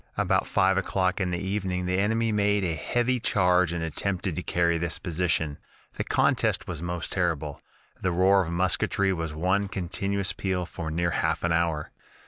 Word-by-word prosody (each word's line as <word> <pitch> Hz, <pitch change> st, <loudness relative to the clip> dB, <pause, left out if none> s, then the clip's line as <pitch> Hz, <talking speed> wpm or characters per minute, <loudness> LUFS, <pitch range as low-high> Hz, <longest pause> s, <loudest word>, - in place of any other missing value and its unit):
"About -, -, +1 dB
five 95 Hz, +1 st, +3 dB
o'clock 95 Hz, 0 st, 0 dB
in 90 Hz, -, 0 dB
the 90 Hz, -, -1 dB
evening 95 Hz, -1 st, -2 dB
the 90 Hz, +1 st, 0 dB
enemy 110 Hz, +3 st, +1 dB
made 105 Hz, -1 st, +2 dB
a 85 Hz, -3 st, 0 dB
heavy 120 Hz, -, 0 dB
charge 90 Hz, -5 st, +3 dB
and 85 Hz, -1 st, -2 dB
attempted 90 Hz, +2 st, -1 dB
to 90 Hz, -, -2 dB
carry 85 Hz, -1 st, +1 dB
this 85 Hz, -1 st, -2 dB
position. 80 Hz, -4 st, -1 dB, 0.3 s
The -, -, -3 dB
contest -, -, +1 dB
was 80 Hz, -3 st, -5 dB
most 85 Hz, -1 st, -4 dB
terrible 80 Hz, -6 st, -1 dB, 0.4 s
the 95 Hz, -, +1 dB
roar 95 Hz, +3 st, +4 dB
of 85 Hz, -2 st, -3 dB
musketry 95 Hz, +2 st, +1 dB
was 80 Hz, -3 st, -3 dB
one 95 Hz, +6 st, 0 dB
continuous 100 Hz, +1 st, -2 dB
peal 95 Hz, -2 st, -2 dB
for 80 Hz, -2 st, -6 dB
near 85 Hz, +2 st, 0 dB
half -, -, 0 dB
an 85 Hz, -, +1 dB
hour. 80 Hz, -2 st, 0 dB
90 Hz, 175 wpm, -27 LUFS, 85-95 Hz, 0.4 s, roar